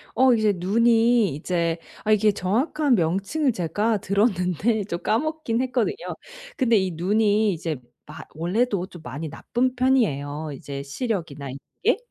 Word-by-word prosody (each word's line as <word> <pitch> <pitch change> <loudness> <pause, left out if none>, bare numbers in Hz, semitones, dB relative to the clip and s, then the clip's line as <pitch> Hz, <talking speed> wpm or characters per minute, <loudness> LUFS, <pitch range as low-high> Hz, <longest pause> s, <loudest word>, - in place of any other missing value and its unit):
어 260 +1 +5
이제 215 -3 +3
눈이 225 - +3
이제 170 +1 -1 0.3
아 215 - +1
이게 215 0 +4
정확한 250 - +1
명칭을 195 - +1
제가 210 +4 0
들었는데 200 +1 +1
좀 170 -3 -4
까먹긴 270 -1 0
했거든요. 255 - 0 0.6
근데 235 -4 +3
이 190 -2 0
눈이 205 +5 +2
이제 165 -2 -3 0.3
마 - - -11
원래도 185 +4 0
좀 175 -4 -12
많이 145 +5 -5
나쁜 245 - -1
편이에요 155 - +1
이제 140 +1 -7
시력이나 160 - -4
이런 130 - -6 0.3
게. 465 - +4
205 Hz, 295 characters per minute, -24 LUFS, 170-235 Hz, 0.6 s, 어